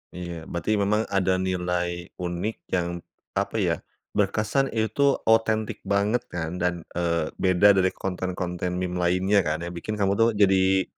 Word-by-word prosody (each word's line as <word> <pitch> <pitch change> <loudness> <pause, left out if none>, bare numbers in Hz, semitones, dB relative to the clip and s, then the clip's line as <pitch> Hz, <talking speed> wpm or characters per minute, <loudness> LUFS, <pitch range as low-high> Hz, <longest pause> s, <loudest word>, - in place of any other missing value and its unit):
Iya. 85 -2 -6
Berarti 85 +6 -1
memang 105 +2 +1
ada 95 -1 +1
nilai 90 -1 -2
unik 90 +5 -2 0.2
yang, 85 -1 -1 0.3
apa - - -2
ya, - - +2 0.4
berkesan 110 +7 +1
itu 115 +6 +2
otentik 110 -1 +2
banget 105 +5 +1
kan. 85 -1 -4
Dan, 90 -1 -1
eee, 85 -2 -1
beda 95 +2 +5
dari 95 -1 +3
konten-konten 90 -1 -3
meme 90 0 -2
lainnya 95 +3 +3
kan, 80 +2 -1
yang 85 - -4
bikin 90 +5 -4
kamu 100 -2 +1
tuh 115 +1 +5
jadi 95 -1 +4
95 Hz, 150 wpm, -25 LUFS, 90-105 Hz, 0.4 s, beda